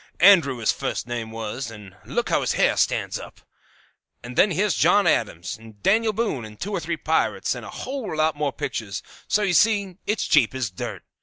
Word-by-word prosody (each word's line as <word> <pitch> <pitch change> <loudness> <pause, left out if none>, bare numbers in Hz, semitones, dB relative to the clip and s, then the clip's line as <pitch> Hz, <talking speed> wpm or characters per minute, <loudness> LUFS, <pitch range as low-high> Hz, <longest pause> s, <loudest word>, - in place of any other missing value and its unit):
Andrew 170 -9 +6
his 115 -2 +2
fust - - -3
name 120 -2 -4
was; 115 +3 -5
and 105 -4 -12
look - - -2
how - - +2
his - - 0
hair - - +3
stands - - 0
up. - - -11 0.8
"And 120 +1 -8
then 205 - +5
here's 195 +3 +1
John 205 -1 +4
Adams, 100 - 0
and 110 -2 -15
Daniel 220 +3 +3
Boone, 210 - -2
and 105 -1 -11
two 205 - -4
or 195 - -1
three 165 0 -3
pirates, 160 +1 0
and - - -7
a - - -8
whole 255 - -5
lot 155 0 +2
more 145 -1 -1
pictures; 100 -6 -4 0.2
so 210 - +2
you 195 -3 +1
see 200 -2 +2
it's 210 +1 0
cheap 135 -5 +3
as 125 -6 -2
dirt. 90 - -6
150 Hz, 205 wpm, -24 LUFS, -, 0.8 s, Andrew